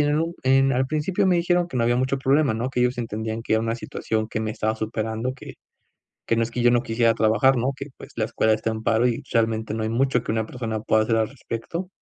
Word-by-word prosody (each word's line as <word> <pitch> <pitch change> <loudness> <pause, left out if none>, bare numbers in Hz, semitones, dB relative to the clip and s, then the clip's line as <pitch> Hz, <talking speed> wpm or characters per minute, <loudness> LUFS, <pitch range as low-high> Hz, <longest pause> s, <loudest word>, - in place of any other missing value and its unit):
en 145 +2 +2 0.2
en 135 +1 +4
al 130 +1 +1
principio 160 +7 0
me 180 -2 +4
dijeron 175 0 +2
que 150 - -6
no 120 - +2
había 120 +1 +2
mucho 130 +2 0
problema, 135 -2 +2
no 120 +3 -2
que 130 - -4
ellos 125 0 +1
entendían 110 0 -3
que 110 - 0
era 110 - +1
una 115 0 -1
situación 110 -2 -3
que 110 - -3
me 110 -1 -2
estaba 110 0 -1
superando 110 +2 -3
que, 135 - -11 0.7
que - - +2
no 115 - +2
es 115 - -2
que 120 0 -2
yo 120 - +5
no 120 -1 +3
quisiera 115 -1 +2
trabajar, 115 +5 +3
no 125 +3 0
que, 140 - -6
pues, - - -12
la 110 - +1
escuela 110 0 +1
está 110 +1 -2
en 110 0 -4
paro, 115 +2 +2
y 120 - -1
realmente 110 -1 0
no 110 - -2
hay - - -1
mucho 125 +1 +1
que - - -2
una 110 -1 -1
persona 115 -3 -4
pueda 110 0 +2
hacer 115 0 +1
al 110 -1 +1
respecto. 140 +7 -6
115 Hz, 260 wpm, -24 LUFS, 110-135 Hz, 0.7 s, yo